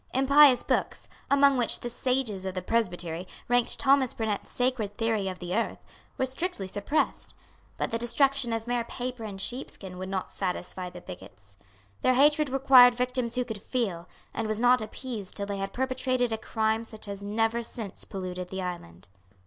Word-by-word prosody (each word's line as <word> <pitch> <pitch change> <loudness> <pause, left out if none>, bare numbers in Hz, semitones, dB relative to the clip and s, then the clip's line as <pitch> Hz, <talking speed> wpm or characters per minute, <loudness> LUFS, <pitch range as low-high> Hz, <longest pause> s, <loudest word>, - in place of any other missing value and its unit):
Impious 270 -1 +6
books, - - -1 0.2
among 280 -1 +5
which 240 -2 +1
the 240 - -4
sages 245 -6 -1
of 190 - -4
the 185 - -2
Presbytery 180 -6 -1 0.2
ranked 245 0 +2
Thomas 270 -2 +3
Burnet's 215 -3 -2
Sacred 245 -5 -1
Theory 225 -4 0
of 185 -1 -4
the 180 0 -4
Earth, 230 - -1 0.4
were 260 - +1
strictly 260 - -3
suppressed. 205 +10 -2 0.4
But - - -2
the 230 - -1
destruction 270 +1 +2
of 225 0 -2
mere 240 -1 0
paper 245 0 -5
and 200 -2 -7
sheepskin 195 -5 -5
would 185 0 -5
not 190 -1 -3
satisfy 180 -1 -3
the 180 0 -11
bigots. 100 - -12 0.4
Their 255 - +3
hatred 295 +2 +4
required 260 -2 +7
victims 250 -1 -1
who 250 0 0
could 220 -4 -6
feel, 195 -10 -2 0.3
and 225 - -2
was 215 0 -1
not 245 +1 +5
appeased 215 -2 -6
till 200 - -2
they 200 0 -4
had 195 0 -3
perpetrated 255 -2 0
a - - -1
crime 220 0 0
such 220 -2 -9
as 200 -1 -5
has - - -10
never 225 +3 0
since 225 -3 -4
polluted 185 -2 -5
the 190 -1 -4
island. 95 - -7
225 Hz, 180 wpm, -28 LUFS, 195-255 Hz, 0.4 s, required